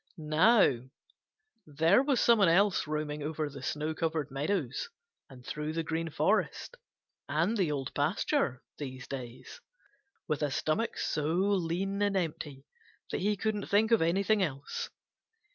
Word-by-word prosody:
Now 155 - +4 0.9
there 160 - +4
was 275 -2 +1
some 235 -2 +5
one 195 -4 +5
else 190 0 +3
roaming 150 -1 -3
over 155 +1 -2
the 140 -1 -10
snow 150 +4 -2
covered 160 -3 -2
meadows 145 - -2 0.4
and 125 -2 -14
through 150 +1 -4
the 165 0 -1
Green 165 +1 -2
Forest 195 - 0 0.5
and 165 +9 +1
the 185 -8 +1
Old 135 -3 -3
Pasture 150 - 0 0.2
these 130 -3 -6
days 130 - -8 0.7
with 150 -1 -1
a 150 - +1
stomach 155 - -1
so 150 -1 -1
lean 195 +1 0
and 200 -1 +2
empty 150 -5 -4 0.5
that - - -2
he 205 +2 +1
couldn't 210 0 -2
think 215 +3 +3
of 230 - +5
anything 195 +5 +2
else. 140 -6 -3
160 Hz, 145 wpm, -30 LUFS, 150-200 Hz, 0.9 s, some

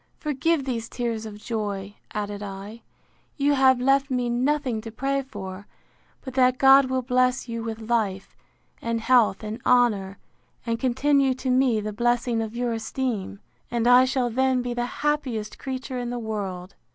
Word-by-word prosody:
Forgive 300 0 0
these 230 -3 -3
tears 230 -3 -3
of 210 -1 -9
joy, 205 -3 -4 0.2
added 205 -1 -4
I: 200 +3 -8 0.6
You 285 0 +3
have 260 -2 +4
left 275 +2 +2
me 250 -2 0
nothing 255 -2 0
to 225 - -7
pray 275 +4 -1
for, 200 -7 -8 0.5
but 260 - -8
that 255 -1 +3
God 270 +1 +7
will 260 0 -1
bless 255 0 +1
you 230 -1 -4
with 225 -1 -5
life, 205 -5 -1 0.5
and 230 0 -1
health, 225 -4 +3
and 215 +1 -5
honour, 210 -6 +2 0.5
and 230 -1 -1
continue 265 +1 +2
to 255 0 -2
me 250 -3 +3
the 210 0 -4
blessing 240 +1 +1
of 220 +1 -5
your 240 -1 -1
esteem; 225 -3 -3 0.3
and 235 -1 -1
I 245 +1 +7
shall 255 -2 0
then 260 +1 +1
be 245 -1 -3
the 240 0 -2 0.2
happiest 255 -8 -1
creature 260 -1 -4
in 245 -1 -3
the 245 - -3
world. 200 -5 -5
240 Hz, 165 wpm, -25 LUFS, 220-260 Hz, 0.6 s, God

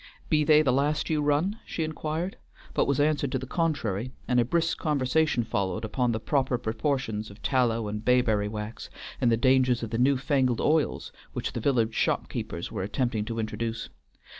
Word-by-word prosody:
"Be 150 -2 +3
they 155 0 +6
the 130 -4 +2
last 145 +3 +1
you 155 -1 +2
run?" 150 +9 +1
she 165 - -3
inquired, 155 +3 -3 0.4
but - - +2
was 140 -1 +1
answered 145 -2 +1
to - - +2
the 130 - -5
contrary, 130 - -1 0.2
and 125 0 +3
a - - +5
brisk 165 +6 0
conversation 150 -2 +1
followed 110 -1 -2
upon 120 +2 0
the 110 - -1
proper 130 0 +1
proportions 110 -2 -2
of 100 +1 -13
tallow 115 -4 +1
and 105 +1 -4
bayberry 115 -4 +3
wax, 105 +1 -6 0.3
and 120 -2 +4
the 115 - +3
dangers 130 -1 +3
of 115 - -4
the 115 - -1
new 135 +2 +4
fangled 130 -3 +1
oils 155 -1 +1 0.2
which - - -3
the - - -3
village 115 -3 +1
shop - - 0
keepers 85 - -5
were - - -3
attempting 110 +2 -1
to 115 +1 -4
introduce. 115 0 -3
125 Hz, 190 wpm, -27 LUFS, 115-145 Hz, 0.4 s, they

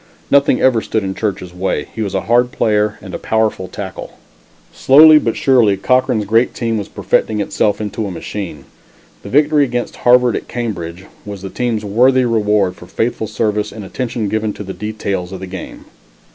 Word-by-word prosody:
Nothing 140 -2 +4
ever 125 -4 +3
stood 110 -1 -2
in 95 -1 -3
Church's 95 -4 -4
way; 90 +2 -2
he 110 - -5
was 100 -2 -3
a 95 - 0
hard 120 +3 +2
player, 105 -5 0
and 95 -3 -9
a - - -4
powerful 110 -4 -1
tackle. - - -8 0.6
Slowly 155 +3 +7
but 115 -6 -2
surely, 120 -7 +3
Cochran's 125 0 +1
great 115 +4 +2
team 115 -2 -1
was 100 - -5
perfecting 110 -1 0
itself 105 0 0
into 105 0 -3
a - - -4
machine. 90 -4 -6 0.6
The - - -9
victory 150 +4 +3
against 120 -2 -3
Harvard 125 0 +4
at - - -5
Cambridge 95 -7 -5 0.2
was 100 -2 -8
the 95 - -6
team's 115 -4 -2
worthy 125 +5 +3
reward 105 -5 +1
for 90 - -13
faithful 115 +1 -2
service 105 -1 -1
and 105 -2 -8
attention 115 0 -3
given 110 0 -1
to - - -8
the 95 -1 -6
details 100 -2 -4
of 95 - -6
the 95 - -6
game. 95 -1 -9
110 Hz, 185 wpm, -17 LUFS, 100-120 Hz, 0.6 s, Slowly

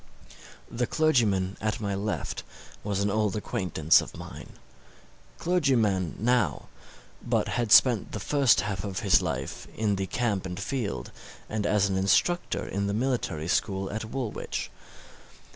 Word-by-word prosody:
The 120 0 -1
clergyman 110 -13 +2
at 110 +2 -1
my 100 -2 -2
left 100 +2 -3 0.4
was 100 -1 -1
an 100 0 +1
old 105 -1 +1
acquaintance 90 -6 +2
of - - -9
mine - - -10 0.8
clergyman 120 - +1
now, 115 - +1 0.5
but - - 0
had 120 -3 -1
spent 120 -5 +6
the 110 - -4
first 140 +3 +3
half 100 -3 -3
of 100 -1 -4
his 100 -3 +4
life 70 -7 -4
in 105 -3 +1
the 95 0 -2
camp 105 -2 -1
and 90 +1 -6
field, 100 - -3 0.4
and 105 -1 -2
as 100 -1 +3
an 95 -1 -1
instructor 100 - +1
in 100 +1 -2
the 100 - -1
military 115 - -1
school 95 +1 0
at 110 +1 -4
Woolwich. 120 -1 -4
105 Hz, 145 wpm, -27 LUFS, 95-120 Hz, 0.8 s, spent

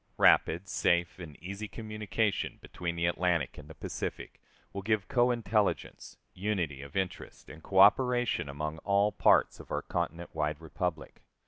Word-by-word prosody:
Rapid, 85 +5 +4
safe, 85 -1 +1
and 80 -4 -9
easy 100 +4 -5
communication 110 -1 -2
between 85 -1 -5
the 85 0 0
Atlantic 85 -5 0
and 75 - -12
the 80 - -10
Pacific - - -6 0.3
will 100 - -4
give 105 -1 0
cointelligence, 120 -4 0 0.2
unity 90 -8 -2
of 70 +3 -7
interest, 95 -2 -4
and 80 - -12
coöperation 110 - +4
among 75 +3 -4
all 100 +2 +2
parts - - +3
of - - -12
our - - -1
continent 85 0 -3
wide 75 -1 -1
republic. 80 0 -4
90 Hz, 140 wpm, -30 LUFS, 80-105 Hz, 0.3 s, Rapid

